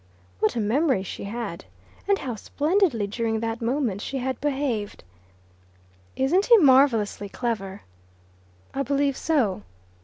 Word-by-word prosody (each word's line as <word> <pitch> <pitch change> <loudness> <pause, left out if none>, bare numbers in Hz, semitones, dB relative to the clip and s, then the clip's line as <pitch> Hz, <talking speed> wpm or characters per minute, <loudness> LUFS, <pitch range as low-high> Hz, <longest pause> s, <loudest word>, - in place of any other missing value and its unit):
What 215 - +1
a - - 0
memory 235 - +1
she 195 - -7
had! 205 - -5 0.4
And 400 - +4
how 255 -8 -4
splendidly 295 - 0
during 220 +2 -2
that 230 +1 -3
moment 235 -4 -1
she 270 - -4
had 260 0 -3
behaved! 265 -8 -2 1.1
"Isn't 340 +10 +2
he 470 - +8
marvellously 260 - +4
clever?" 205 -4 -4 0.9
"I 275 - -1
believe 280 +1 +1
so." 260 - 0
245 Hz, 125 wpm, -25 LUFS, 215-285 Hz, 1.1 s, he